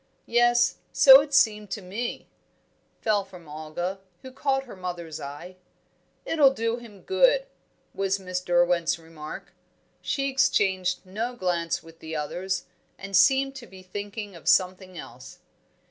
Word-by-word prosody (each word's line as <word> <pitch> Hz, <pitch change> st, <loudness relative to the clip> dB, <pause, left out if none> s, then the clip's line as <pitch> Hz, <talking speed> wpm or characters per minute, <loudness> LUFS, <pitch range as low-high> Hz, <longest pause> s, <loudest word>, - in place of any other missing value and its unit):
"Yes, 240 Hz, 0 st, +3 dB
so 270 Hz, 0 st, +9 dB
it 290 Hz, 0 st, -7 dB
seemed 210 Hz, -6 st, +3 dB
to 210 Hz, -, -4 dB
me," 210 Hz, +7 st, -5 dB, 0.7 s
fell 210 Hz, -2 st, +2 dB
from 180 Hz, -4 st, -14 dB
Olga, 155 Hz, +5 st, -5 dB, 0.2 s
who 260 Hz, -, -9 dB
caught 270 Hz, 0 st, 0 dB
her 250 Hz, -, -11 dB
mother's 175 Hz, -4 st, -6 dB
eye. 155 Hz, +6 st, -8 dB, 0.7 s
"It'll 295 Hz, -4 st, +5 dB
do 230 Hz, +1 st, -1 dB
him 225 Hz, -5 st, -13 dB
good," -, -, +3 dB, 0.5 s
was 195 Hz, 0 st, 0 dB
Miss 185 Hz, -1 st, -4 dB
Derwent's 175 Hz, -1 st, +2 dB
remark. 160 Hz, -2 st, -10 dB, 0.5 s
She 275 Hz, -1 st, -1 dB
exchanged 200 Hz, -10 st, +1 dB
no 225 Hz, +6 st, -4 dB
glance 175 Hz, -5 st, -1 dB
with 165 Hz, 0 st, -16 dB
the 160 Hz, 0 st, -7 dB
others, 180 Hz, +5 st, -3 dB, 0.3 s
and 195 Hz, 0 st, -5 dB
seemed 270 Hz, +5 st, +4 dB
to 240 Hz, -3 st, -10 dB
be 190 Hz, -1 st, -14 dB
thinking 205 Hz, +1 st, -6 dB
of 170 Hz, -, -13 dB
something 185 Hz, -1 st, +1 dB
else. 125 Hz, -4 st, -11 dB
190 Hz, 140 wpm, -26 LUFS, 175-240 Hz, 0.7 s, so